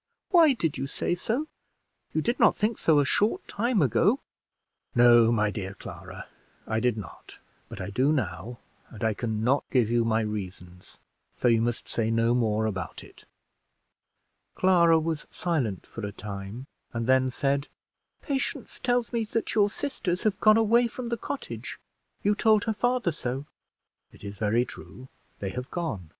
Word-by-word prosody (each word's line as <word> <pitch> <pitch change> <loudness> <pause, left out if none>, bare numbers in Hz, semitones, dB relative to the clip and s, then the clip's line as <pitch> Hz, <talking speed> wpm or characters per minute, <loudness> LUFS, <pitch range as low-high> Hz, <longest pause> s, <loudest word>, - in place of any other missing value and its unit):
Why 330 -6 +7
did 165 - -2
you 135 - -2
say 155 - -2
so? 230 - -2 0.6
You 155 - -1
did 235 - 0
not 230 - +5
think 215 +2 -1
so 160 -2 +4
a 145 - +4
short 215 - +1
time 225 -4 +1
ago." 195 - +3 0.8
"No, 120 -1 +6
my 105 -2 +2
dear 100 -1 -5
Clara, - - -9 0.4
I 110 0 -1
did 120 -1 +1
not, 105 - -10 0.3
but - - -8
I 95 +1 -5
do 130 +8 +2
now, 115 - -2 0.3
and 115 -1 -9
I 110 -1 +2
can 110 -1 -3
not 135 +4 +2
give 120 -4 +2
you 120 0 +3
my 115 0 +1
reasons; 95 -4 -7 0.4
so - - 0
you 115 -1 +4
must 120 +1 -2
say 110 -1 -1
no 115 +1 +2
more 110 -3 +1
about 100 -5 -4
it." - - -17 1.3
Clara 170 -3 +5
was 160 -1 -2
silent 130 - -2
for 115 - -9
a 100 - -3
time, 100 +4 -7 0.3
and 115 -1 -2
then 130 +1 +3
said 140 +2 0 0.6
"Patience 275 -2 -3
tells 245 -1 0
me 230 -1 +1
that 225 +1 -2
your 205 -2 +4
sisters 190 -8 -3
have 210 -3 +1
gone 215 0 +6
away 230 +2 +4
from 240 +1 -6
the 235 - 0
cottage. 280 +5 -6 0.5
You 205 - +3
told 215 0 +3
her 220 - 0
father 245 -3 +1
so." 135 -2 -4 0.7
"It - - -18
is 100 0 -6
very 110 +3 +2
true; 130 +1 -11 0.3
they 100 - -4
have 125 +3 -6
gone." 110 - -4
130 Hz, 170 wpm, -27 LUFS, -, 1.3 s, Why